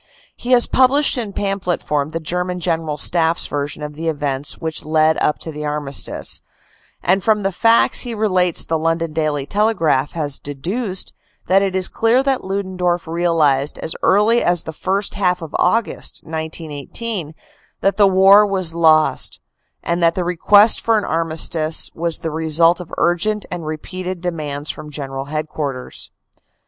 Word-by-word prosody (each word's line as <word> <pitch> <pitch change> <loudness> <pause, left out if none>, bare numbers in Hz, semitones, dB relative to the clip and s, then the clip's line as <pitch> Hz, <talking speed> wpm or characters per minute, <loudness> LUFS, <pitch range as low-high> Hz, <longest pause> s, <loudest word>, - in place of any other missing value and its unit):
He 250 +1 -1
has 240 -1 +6
published 275 +3 +3
in 230 -5 -3
pamphlet 195 -3 -2
form 145 -1 -1
the 165 +1 -4
German 180 +3 -2
General 165 -3 -1
Staff 165 +2 +2
s - - -2
version 145 +1 -4
of 150 0 -6
the 160 +3 -5
events 145 -2 -2
which 160 -1 -4
led 155 +1 +2
up 150 - +1
to 160 - -7
the 150 0 -7
armistice, 150 -2 -2 0.6
and 190 +1 +2
from 215 -2 +2
the 195 - 0
facts 225 +5 +3
he 240 -3 -3
relates 185 -5 +2
the 160 -1 -1
London 165 0 -1
Daily 150 -3 -1
Telegraph 165 -8 +1
has 150 -5 -2
deduced 185 - -3 0.3
that 190 +1 +3
it 195 -1 -1
is 185 -1 +2
clear 235 +4 +2
that 270 -1 0
Ludendorff 185 -2 -2
real 165 -1 +1
ized 140 0 +1
as 160 - -3
early 215 +5 +3
as 175 -2 +1
the 160 - -7
first 195 +5 -2
half 180 -3 +1
of 160 - -9
August, 225 +5 -1
1918, 160 - -5 0.5
that 195 - +1
the 205 -2 +6
war 195 +2 +6
was 190 -5 0
lost, 160 -2 +2 0.4
and 170 +1 -1
that 165 0 +3
the 185 - -1
request 200 +5 +4
for 225 -1 +2
an 210 - -1
armistice 160 -1 0
was 165 0 -1
the 160 - -5
result 160 +2 +2
of 175 -2 -9
urgent 200 +5 +1
and 170 -3 -5
repeated 180 +4 -5
demands 155 -4 -3
from 155 -1 -10
General 135 -2 -5
Headquarters. 150 -3 -4
170 Hz, 165 wpm, -19 LUFS, 155-195 Hz, 0.6 s, has